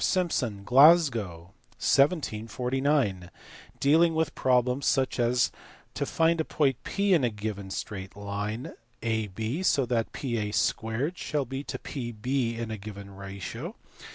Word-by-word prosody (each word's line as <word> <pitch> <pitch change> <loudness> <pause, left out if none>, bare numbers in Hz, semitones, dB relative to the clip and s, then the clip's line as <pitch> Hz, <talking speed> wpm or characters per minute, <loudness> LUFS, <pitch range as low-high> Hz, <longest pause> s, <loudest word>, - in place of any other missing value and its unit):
Simson, 125 - 0
Glasgow, 120 - +4 0.2
1749), 130 - +1 0.5
dealing 160 +4 +4
with 160 -2 0
problems 125 +1 +1
such 130 -1 +1
as 120 +1 +2 0.4
to - - -2
find 165 0 +2
a - - 0
point 135 -5 0
P 200 -1 +1
in 160 -6 +4
a 120 - +3
given 105 -2 -5
straight 95 0 -6
line 105 +4 -4 0.3
AB 110 - -2
so 140 -7 +3
that 115 -2 -1
PA - - -8
2 115 +2 0
shall 150 -5 -2
be 135 +3 -5
to - - -4
PB 120 -1 -3
in 115 -1 -4
a 110 - -5
given 100 -1 -9
ratio. 100 -3 -7
120 Hz, 130 wpm, -28 LUFS, 105-140 Hz, 0.5 s, Glasgow